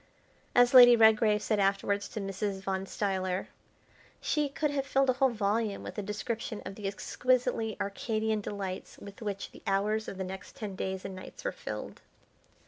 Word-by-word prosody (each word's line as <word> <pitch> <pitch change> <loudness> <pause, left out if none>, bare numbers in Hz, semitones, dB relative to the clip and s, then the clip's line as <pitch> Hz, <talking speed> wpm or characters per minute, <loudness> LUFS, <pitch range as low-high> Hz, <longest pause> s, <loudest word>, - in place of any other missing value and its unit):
As 245 +1 +6
Lady 245 -2 +10
Redgrave 220 -1 +5
said 215 -2 +1
afterwards 200 +1 +1
to - - -5
Mrs. 195 0 -3
Van 190 0 -2
Stuyler, 190 -2 -2 0.7
she 300 -2 0
could 295 +1 -1
have 275 -1 -2
filled 270 -1 +3
a - - -1
whole 265 +1 +3
volume 215 -1 -1
with - - -7
a - - 0
description 215 +2 -4
of - - -5
the 200 0 -5
exquisitely 225 +2 0
arcadian 215 +1 -1
delights 195 -2 -5
with 200 +1 -11
which 200 -2 -4
the - - -14
hours 210 +3 +1
of 195 - -6
the 190 - -2
next 190 +1 -8
ten 210 -7 -5
days 190 0 -3
and 190 - -5
nights 185 - -10
were - - -1
filled. - - -7
210 Hz, 175 wpm, -30 LUFS, 195-230 Hz, 0.7 s, Lady